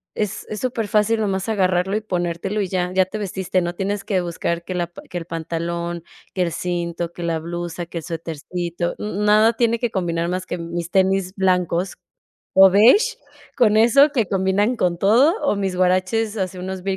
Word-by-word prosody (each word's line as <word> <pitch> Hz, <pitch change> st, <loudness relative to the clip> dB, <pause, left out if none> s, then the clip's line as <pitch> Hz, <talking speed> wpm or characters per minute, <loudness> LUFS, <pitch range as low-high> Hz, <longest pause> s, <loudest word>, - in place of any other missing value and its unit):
es 210 Hz, -2 st, -3 dB
es 215 Hz, -, -4 dB
superfácil 225 Hz, -3 st, +1 dB
nomás 195 Hz, -1 st, -1 dB
agarrarlo 190 Hz, -1 st, +1 dB
y -, -, -3 dB
ponértelo 180 Hz, +1 st, -2 dB
y 190 Hz, -, -1 dB
ya, 180 Hz, -1 st, -1 dB
ya 190 Hz, 0 st, +4 dB
te 200 Hz, +3 st, -6 dB
vestiste, 190 Hz, -2 st, -1 dB
no 175 Hz, +1 st, -3 dB
tienes 200 Hz, +2 st, -2 dB
que 190 Hz, -3 st, 0 dB
buscar 170 Hz, 0 st, -3 dB
que 185 Hz, -, -5 dB
la 175 Hz, -1 st, -1 dB
pan 175 Hz, -, -13 dB
que 180 Hz, -, -5 dB
el 165 Hz, -, -5 dB
pantalón, 170 Hz, +1 st, -4 dB, 0.3 s
que 185 Hz, -, -2 dB
el 170 Hz, -, -1 dB
cinto, 170 Hz, -1 st, -3 dB
que 175 Hz, -, -7 dB
la 165 Hz, -1 st, -1 dB
blusa, 175 Hz, +1 st, -5 dB
que 170 Hz, -, -7 dB
el -, -, -10 dB
suétercito. 170 Hz, +1 st, -4 dB
Mm, 210 Hz, 0 st, -3 dB
nada 215 Hz, +2 st, +5 dB
tiene 230 Hz, 0 st, +1 dB
que 240 Hz, -2 st, -1 dB
combinar 170 Hz, -2 st, -1 dB
más 185 Hz, +1 st, -3 dB
que 175 Hz, -, -4 dB
mis 170 Hz, 0 st, -5 dB
tenis 190 Hz, -1 st, +2 dB
blancos 180 Hz, -1 st, 0 dB, 0.6 s
o 190 Hz, 0 st, +9 dB
beige 250 Hz, -, +5 dB, 0.4 s
con 215 Hz, -4 st, +4 dB
eso 275 Hz, +6 st, +6 dB
que 230 Hz, -8 st, 0 dB
combinan 195 Hz, +5 st, +1 dB
con 175 Hz, -5 st, 0 dB
todo, 245 Hz, -, +5 dB
o -, -, +1 dB
mis 195 Hz, -2 st, -2 dB
huaraches 185 Hz, +4 st, +1 dB
así 185 Hz, -1 st, -3 dB
unos 185 Hz, 0 st, -5 dB
185 Hz, 190 wpm, -21 LUFS, 175-210 Hz, 0.6 s, o